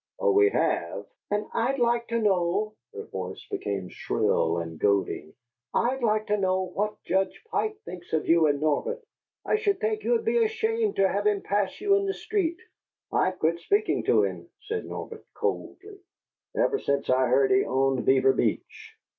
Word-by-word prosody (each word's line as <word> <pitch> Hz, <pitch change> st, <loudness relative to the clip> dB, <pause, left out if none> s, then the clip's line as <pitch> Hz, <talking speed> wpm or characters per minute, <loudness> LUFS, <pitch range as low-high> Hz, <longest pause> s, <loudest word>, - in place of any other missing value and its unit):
"Oh, 480 Hz, -2 st, +3 dB
we 410 Hz, 0 st, +5 dB
have?" -, -, -1 dB, 0.2 s
"And 205 Hz, +1 st, 0 dB
I'd 250 Hz, +4 st, 0 dB
like 235 Hz, -1 st, +1 dB
to 230 Hz, -, -1 dB
know" 200 Hz, 0 st, +1 dB, 0.2 s
her -, -, -7 dB
voice -, -, -7 dB
became 100 Hz, -2 st, -3 dB
shrill 80 Hz, +1 st, 0 dB
and 80 Hz, -2 st, -5 dB
goading 100 Hz, -6 st, 0 dB, 0.4 s
"I'd 255 Hz, +2 st, +1 dB
like 215 Hz, -2 st, +1 dB
to 210 Hz, -, +1 dB
know 190 Hz, -1 st, +1 dB
what 210 Hz, +3 st, -3 dB
Judge 190 Hz, +2 st, -1 dB
Pike 430 Hz, -1 st, -1 dB
thinks 175 Hz, -1 st, -9 dB
of 160 Hz, -1 st, 0 dB
you 165 Hz, -1 st, +5 dB
and 145 Hz, -1 st, +1 dB
Norbert! 155 Hz, -, 0 dB, 0.5 s
I -, -, +2 dB
should 405 Hz, -3 st, 0 dB
think 435 Hz, -1 st, -1 dB
you'd 465 Hz, -2 st, +1 dB
be 465 Hz, +1 st, +3 dB
ashamed 445 Hz, -1 st, 0 dB
to 195 Hz, -, +4 dB
have 205 Hz, +2 st, 0 dB
him 205 Hz, -2 st, +1 dB
pass 200 Hz, -1 st, -1 dB
you 400 Hz, 0 st, +2 dB
in 395 Hz, 0 st, -1 dB
the 390 Hz, -, -1 dB
street." 345 Hz, -6 st, -1 dB, 0.6 s
"I've 185 Hz, 0 st, +1 dB
quit 165 Hz, +1 st, +1 dB
speaking 410 Hz, -, +1 dB
to -, -, +4 dB
him," -, -, -4 dB
said 445 Hz, +2 st, -4 dB
Norbert, 455 Hz, -1 st, -7 dB
coldly, 400 Hz, 0 st, -4 dB, 0.6 s
"ever 420 Hz, -, +2 dB
since 140 Hz, 0 st, -1 dB
I 130 Hz, 0 st, +3 dB
heard 130 Hz, +2 st, +3 dB
he 195 Hz, +1 st, +4 dB
owned 135 Hz, -1 st, +1 dB
Beaver 135 Hz, 0 st, +4 dB
Beach." -, -, -3 dB
210 Hz, 175 wpm, -26 LUFS, -, 0.6 s, we